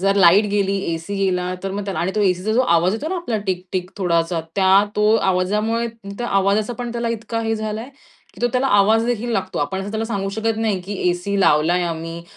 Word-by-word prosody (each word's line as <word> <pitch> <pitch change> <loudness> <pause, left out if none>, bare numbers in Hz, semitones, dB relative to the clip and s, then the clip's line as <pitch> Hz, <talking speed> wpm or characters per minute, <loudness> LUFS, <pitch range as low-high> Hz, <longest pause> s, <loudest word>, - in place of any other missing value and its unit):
जर 195 +1 +2
लाईट 190 +2 +6
गेली, 200 -1 +1 0.2
एसी 165 +5 -5
गेला 180 -2 0
तर 195 - -3
मग 205 0 -3
त्याला 195 -2 -4
आणि 180 +3 -1
तो 215 - +1
एसीचा 185 +2 +1
जो 240 - +3
आवाज 175 +3 +3
येतो 285 +8 -4
ना 370 - -2
आपला 245 -11 -2
टिक 185 -1 -2
टिक 185 -1 -2
थोडासा, 170 -2 0 0.2
त्या 195 +1 +5
तो 210 +1 +4
आवाजामुळे 210 +5 0 0.3
त्या 240 - -2
आवाजाचा 200 +3 +1
पण 240 -1 -4
त्याला 235 0 -2
इतका 230 0 -3
हे 225 0 0
झालाय, 215 +2 -4 0.5
की - - -14
तो 245 - +3
त्याला 255 +1 +1
आवाजदेखील 225 +2 +2
लागतो. 190 -3 -2
आपण 145 +7 -2
असं 200 - -5
त्याला 220 +1 -2
सांगू 200 -3 -2
शकत 225 0 0
नाही 215 -4 0
की 200 +3 -6 0.2
एसी 190 +3 -2
लावलाय 170 +2 +3
आम्ही. 165 0 -5
200 Hz, 215 wpm, -20 LUFS, 185-225 Hz, 0.5 s, लाईट